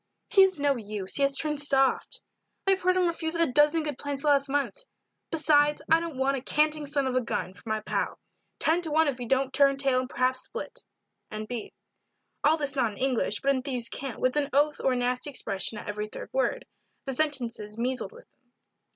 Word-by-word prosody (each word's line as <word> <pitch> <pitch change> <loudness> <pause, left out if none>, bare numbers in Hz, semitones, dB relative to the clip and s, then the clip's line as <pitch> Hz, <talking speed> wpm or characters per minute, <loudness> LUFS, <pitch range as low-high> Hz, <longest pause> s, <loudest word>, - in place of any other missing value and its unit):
"He 400 - +7
is 380 -4 +4
no 280 -2 +2
use, 205 -3 -3
he - - -1
has 275 0 +2
turned 300 -2 0
soft. 270 -2 +1 0.4
I 390 - +4
have 385 - +1
heard 365 +1 +3
him 365 - +3
refuse 330 -1 -2
a 335 0 +3
dozen 295 +3 +3
good 295 -3 -4
plants 285 -1 -4
the 300 - +2
last 280 -1 +3
month. 285 - -1 0.5
Besides, 295 -2 +3
I 325 - +7
don't 330 -5 -5
want 270 +1 +1
a - - -5
canting 300 +2 +1
son 280 -1 0
of 260 -1 -1
a 255 - +3
gun 190 -5 -3
for 185 +5 -12
my 220 0 -1
pal - - -2 0.4
ten 330 +3 +3
to 330 - -2
one 315 +1 +3
if 265 -3 -2
he 245 - -5
don't 265 +1 +1
turn 275 0 +4
tail 270 -2 +2
and 255 0 -4
perhaps 255 +1 0
split." - - -7 0.5
N. 215 0 -5
B. 235 -1 -6 0.7
All 310 +2 +4
this 285 -3 -2
not 240 -5 +1
in - - -13
English, 255 -5 0
but 275 - +3
in 260 - -1
thieve's 250 -3 -2
cant, 270 -3 -5
with 255 +1 +1
an 285 -1 +1
oath 295 +2 +2
or 265 - +3
a - - 0
nasty 250 +3 -1
expression 210 -5 -3
at - - -8
every 210 0 -3
third - - -8
word. - - 0 0.4
The 270 - -2
sentences 245 -7 -2
measled 255 - -2
with 485 +2 -14
them. 250 -2 -44
275 Hz, 225 wpm, -27 LUFS, 250-300 Hz, 0.7 s, He